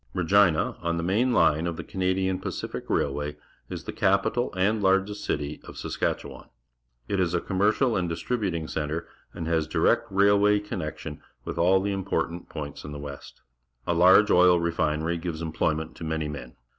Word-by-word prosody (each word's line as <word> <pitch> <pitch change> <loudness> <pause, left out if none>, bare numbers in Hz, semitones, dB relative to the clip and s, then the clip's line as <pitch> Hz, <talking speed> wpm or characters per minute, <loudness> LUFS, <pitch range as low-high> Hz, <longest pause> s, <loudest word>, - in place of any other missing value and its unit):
Regina, 90 -2 +3
on 85 0 -1
the 85 - -2
main 110 +9 +2
line 80 -7 +3
of 85 -1 -3
the 85 - -5
Canadian 95 +1 -1
Pacific - - -5
Railway^ 75 +1 -1 0.3
is - - -6
the - - -6
capital 100 +6 +1
and 105 +4 +1
largest 95 +2 +1
city 75 0 -3
of - - -10
Saskatchew^an. - - -3 0.6
It 100 - -1
is 90 -1 +1
aj; 85 - -2
ommercial 105 +6 +2
an 90 -2 0
d 85 - -2
distributing 90 -5 -2
ce - - -6
ntre 80 +2 -2 0.3
and 85 -2 -4
has 80 -2 +1
direct - - +2
railway 100 +1 +4
connection 100 -7 -6 0.2
with - - -4
all 90 +3 +4
the 100 +1 -1
important 90 -3 -2
points 70 -1 -7
in 75 - -7
the - - -6
West. 70 -1 -9 0.4
A 85 - +1
large 95 +5 +6
oil 90 -1 +6
refinery 85 0 0
gives 85 -1 -4
emploj'ment 80 0 -1
to - - -10
many 80 -1 -2
men. 70 -5 -8
85 Hz, 175 wpm, -26 LUFS, 80-95 Hz, 0.6 s, large